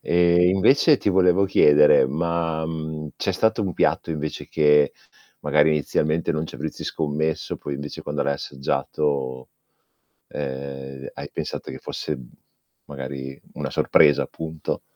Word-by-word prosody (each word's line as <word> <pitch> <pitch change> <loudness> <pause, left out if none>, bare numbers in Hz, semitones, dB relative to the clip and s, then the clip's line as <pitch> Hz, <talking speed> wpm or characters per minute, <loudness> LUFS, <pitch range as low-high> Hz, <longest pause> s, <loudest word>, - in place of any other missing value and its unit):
E 85 0 +3
invece, 130 - +4
ti 105 - -1
volevo 95 0 +4
chiedere, 75 -7 +5
ma, 80 +2 -1
mhmm, 80 -1 -5
c'è - - -1
stato 110 -1 +1
un 95 - -2
piatto 85 - 0
invece 75 -1 -4
che 75 -2 +4 0.5
magari 80 - +3
inizialmente 75 +2 0
non 80 0 -2
ci - - -12
avresti 75 +3 -6
scommesso, 80 0 -2
poi 70 - -6
invece 70 +1 -7
quando 75 0 -2
l'hai 70 - 0
assaggiato, 70 -1 -2 0.8
ehm, 70 -1 -6
hai - - -8
pensato - - -5
che - - -7
fosse, - - -4
mhmm, 60 -2 -13 0.6
magari 70 -1 -7
una - - -5
sorpresa, 75 - +4
appunto? 80 -1 -5
75 Hz, 135 wpm, -23 LUFS, 70-85 Hz, 0.8 s, chiedere